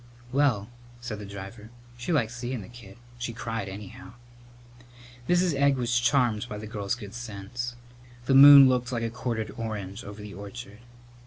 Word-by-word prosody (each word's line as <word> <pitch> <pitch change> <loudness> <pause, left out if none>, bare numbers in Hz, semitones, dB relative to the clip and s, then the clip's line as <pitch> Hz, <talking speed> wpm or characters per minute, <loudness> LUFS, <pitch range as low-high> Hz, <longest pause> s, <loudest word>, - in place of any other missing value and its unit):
"Well," 130 -7 +2 0.3
said 120 -3 -6
the 105 - -8
driver, 100 +2 -9 0.3
"she 120 +7 -4
liked 120 -9 +1
seein' 120 0 -4
the - - -11
kid. 115 -4 -13 0.2
She 120 -1 -4
cried, 115 -3 -4
anyhow." 100 +2 -10 1.2
Mrs. 175 -1 +3
Egg 140 0 +3
was 120 -1 +1
charmed 120 -3 +2
by 105 - -5
the 105 - -7
girl's 105 0 -3
good 105 -4 -10
sense. 120 +1 -6 0.5
The 135 - +2
moon 140 0 +10
looked 125 -1 0
like 120 -2 -2
a 115 - -2
quartered 115 -3 -3
orange 105 -2 -5
over 100 +1 -9
the 105 -1 -9
orchard. 100 +1 -9
115 Hz, 165 wpm, -27 LUFS, 105-125 Hz, 1.2 s, moon